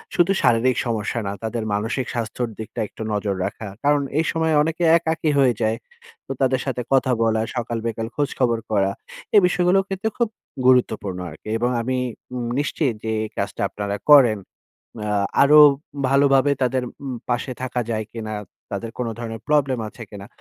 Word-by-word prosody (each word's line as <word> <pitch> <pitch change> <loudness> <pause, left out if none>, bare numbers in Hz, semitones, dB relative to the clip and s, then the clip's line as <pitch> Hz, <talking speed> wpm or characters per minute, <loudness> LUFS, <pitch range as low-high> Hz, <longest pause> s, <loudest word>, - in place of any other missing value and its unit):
শুধু 175 +1 +4
শারীরিক 120 +2 +3
সমস্যা 115 0 -1
না, - - -2
তাদের 115 0 -2
মানসিক 115 +5 -1
স্বাস্থ্যর 120 0 -3
দিকটা 110 - -7
একটু - - -13
নজর 100 -1 -1
রাখা। 105 +2 -5 0.2
কারণ 145 0 +3 0.2
এই 160 - +1
সময় 160 -1 +1
অনেকে 165 +3 -1
একাকী 160 -1 -1
হয়ে 130 -3 +4
যায়। 110 +1 +1 0.5
তো - - -5
তাদের 130 -1 +2
সাথে 130 -2 -2
কথা 130 -1 +3
বলা, 110 -1 +2
সকাল 120 -1 -2
বিকাল 115 0 -3
খোঁজখবর 130 -5 0
করা। 100 -2 +2 0.4
এ - - +9
বিষয়গুলোর 180 +2 +2
কিন্তু 195 +3 -2
খুব 235 -2 +1 0.4
গুরুত্বপূর্ণ 110 -7 +2
আরকি। 80 +8 -11
এবং 120 - +1
আমি 130 +2 -1 0.4
উম 120 - -3
নিশ্চিত 145 -2 0
যে 110 - -2
এই 110 - -5
কাজটা - - -3
আপনারা 100 -1 -3 0.2
করেন। 120 -7 +7 0.7
আ 105 - -2 0.3
আরো 150 +2 +7 0.5
ভালোভাবে 140 0 +4
তাদের 130 0 0 0.2
উম 130 -2 -3
পাশে 120 +2 -1
থাকা 125 -1 -1
যায় 110 -1 -2
কিনা? 110 -2 -5 0.4
তাদের 110 +3 -4
কোন 125 - -1
ধরনের 115 -2 -6
প্রবলেম 140 -4 +2
আছে 115 - -10
কিনা? 100 -1 -9
125 Hz, 170 wpm, -22 LUFS, 110-140 Hz, 0.7 s, এ